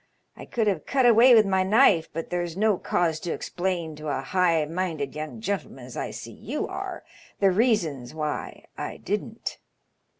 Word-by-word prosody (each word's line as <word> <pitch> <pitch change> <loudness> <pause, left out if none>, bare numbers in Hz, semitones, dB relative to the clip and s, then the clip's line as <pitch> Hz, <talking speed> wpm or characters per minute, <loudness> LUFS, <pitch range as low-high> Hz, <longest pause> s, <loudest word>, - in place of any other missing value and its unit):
I - - -10
could 230 -2 -1
have 195 -7 -1
cut 265 -2 +2
away 240 +1 +8
with 220 -1 +6
my 190 -1 +2
knife, 190 -4 +4
but 165 +1 -5
there's 175 -1 -2
no 210 -2 +2
cause 165 -3 0
to 170 - -3
explain 175 -3 -3
to 155 0 -7
a 140 -2 -1
high 170 0 +2
minded 160 -4 -3
young 155 +8 -6
gentleman, 190 - -4
as 125 - -10
I - - -3
see - - -8
you - - -4
are, - - -6 0.4
the 195 -1 +4
reasons 180 - +1
why 150 -1 -4
I - - -5
didn't. - - -4
175 Hz, 175 wpm, -26 LUFS, 155-205 Hz, 0.4 s, away